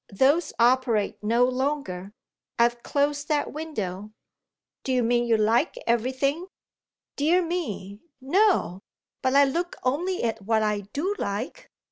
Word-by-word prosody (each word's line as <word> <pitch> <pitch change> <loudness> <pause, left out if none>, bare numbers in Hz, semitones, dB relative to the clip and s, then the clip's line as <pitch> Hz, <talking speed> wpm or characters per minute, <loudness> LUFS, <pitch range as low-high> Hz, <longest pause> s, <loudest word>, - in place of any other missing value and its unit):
"Those 275 - +2
operate 240 -3 +2
no 235 +3 +3
longer. 255 -8 -2 0.5
I've 235 0 +2
closed 285 +1 -1
that 300 -2 0
window." 215 - -5 0.7
"Do 265 - -2
you 250 -1 +2
mean 240 +1 +2
you 230 -2 +3
like 230 - +2
everything?" 260 +8 0 0.7
"Dear 335 +5 +2
me, 210 - -4 0.2
no! 315 - +2 0.4
But 260 0 +1
I 280 0 +7
look 345 +6 -2
only 345 +9 -1
at 225 -2 -1
what 220 +2 +1
I 210 -2 -1
do 360 +8 -1
like." 225 - -4
255 Hz, 130 wpm, -25 LUFS, 220-295 Hz, 0.7 s, I